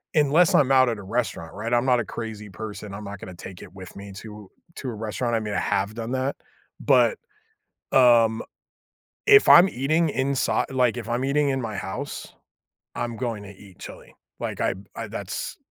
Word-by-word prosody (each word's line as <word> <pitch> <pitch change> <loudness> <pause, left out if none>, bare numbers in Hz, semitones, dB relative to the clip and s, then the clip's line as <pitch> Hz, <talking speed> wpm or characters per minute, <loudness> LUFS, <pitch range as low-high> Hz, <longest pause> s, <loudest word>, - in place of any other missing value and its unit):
unless 155 +4 +4
I'm 135 -2 +4
out 130 -2 +5
at 115 - -2
a - - -9
restaurant, 95 -6 -3
right, 115 +4 -3
I'm 120 +2 +3
not 125 -2 +3
a - - -5
crazy 110 -2 -7
person, 105 0 -7
I'm 105 +1 -7
not 100 -1 -7
gonna 90 -1 -9
take 90 +1 -10
it - - -13
with 95 -2 -11
me 100 0 -9
to 105 -2 -10 0.3
to 130 - -4
a - - -4
restaurant. 115 +2 -2
I - - +2
mean, 105 -1 -4
I - - +2
have 100 +3 -1
done 115 +1 -5
that. 130 +2 -1 0.5
But, - - +4 0.8
um, 115 -3 +5 0.8
if 415 0 +7
I'm 180 +3 +9
eating 155 +5 +1
insi 135 0 +1
like, 125 -3 +2
if 115 -1 -7
I'm 120 +2 -1
eating 140 +1 +2
in 135 -1 -1
my 110 -3 -4
house, 125 +9 -6 0.6
I'm 120 -1 -3
going 115 -5 -3
to 100 - -10
eat 95 -2 -16
chili. - - -11 0.3
Like, - - -4
I'm 95 +1 -2
I - - -5
that's - - -5
115 Hz, 195 wpm, -24 LUFS, 105-130 Hz, 0.8 s, I'm